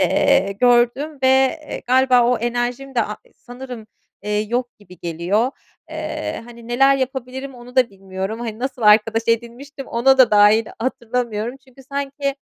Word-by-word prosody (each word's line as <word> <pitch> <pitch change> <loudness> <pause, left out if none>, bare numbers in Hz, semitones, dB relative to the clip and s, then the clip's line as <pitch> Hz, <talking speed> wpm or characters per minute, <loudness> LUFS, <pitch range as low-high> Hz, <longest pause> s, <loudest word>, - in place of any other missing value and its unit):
eee, 195 +2 +3
gördüm 245 +5 +2
ve, 260 - +4 0.4
eee, - - -5
galiba 255 0 +4
o 245 +1 +2
enerjim 240 +3 -3
de 235 - +2
a 210 0 -4
s - - -26
sanırım, 245 -2 -10 0.4
eee, 210 +1 -1
yok 245 +3 -3
gibi 185 -4 -16
geliyor. 175 +8 -1 0.4
Eee, - - -5
hani, 235 0 -13
neler 270 +3 +4
yapabilirim, 265 0 -4
onu 245 +1 -14
da 250 -3 +4
bilmiyorum, 195 +3 -6
hani, 225 -2 -5
nasıl 255 -1 -4
arkadaş 220 +2 +4
edinmiştim, 240 +5 -3
ona 265 +3 +3
da 255 -4 +6
dair 210 +2 +5
hatırlamıyorum. 235 -1 -3
Çünkü 265 0 -19
sanki 275 0 -3
240 Hz, 155 wpm, -20 LUFS, 220-260 Hz, 0.4 s, da